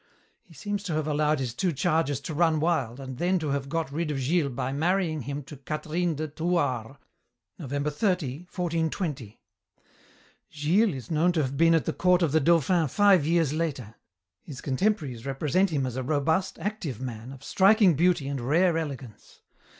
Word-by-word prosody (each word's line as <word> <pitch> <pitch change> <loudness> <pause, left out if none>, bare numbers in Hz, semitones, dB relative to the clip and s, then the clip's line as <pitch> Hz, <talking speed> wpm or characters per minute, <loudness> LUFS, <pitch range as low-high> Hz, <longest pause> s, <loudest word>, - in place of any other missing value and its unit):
He 165 - -20
seems 205 +2 -3
to 175 - -2
have 155 -1 -1
allowed 150 0 +1
his 130 -4 -3
two 180 +7 0
charges 160 -3 0
to 160 - -5
run 160 0 +2
wild, 145 -7 0
and 130 -2 -7
then 180 +2 +2
to 155 -4 -3
have 140 0 -2
got 165 -1 -2
rid 160 +2 -2
of 150 - -2
Gilles 145 +3 +1
by 125 +1 -3
marrying 160 +1 0
him 140 +3 -5
to 140 +2 -11
Catherine 155 +4 -2
de 155 +2 -3
Thouars, 145 -6 -1 0.6
November 145 0 -2
30, 180 - -1
1420. 160 - -3 1.1
"Gilles 170 +6 +2
is 125 0 -8
known 165 +3 +3
to 160 -3 +1
have 135 +1 -3
been 165 +3 +4
at 160 - +1
the 160 - -1
court 180 0 +3
of 160 - +1
the 160 - +4
Dauphin 165 +2 +3
five 195 -1 +4
years 165 -3 +2
later. 140 -9 -3 0.5
His 140 -4 -9
contemporaries 140 - -1
represent 155 +8 +1
him 145 -5 -1
as 125 -2 -4
a - - -1
robust, 160 +8 0
active 175 - -4
man, 120 -1 -6
of 135 -1 -12
striking 195 +1 +4
beauty 165 -2 +2
and 140 -2 -3
rare 165 +6 +2
elegance. 135 -8 -8
155 Hz, 180 wpm, -27 LUFS, 135-175 Hz, 1.1 s, been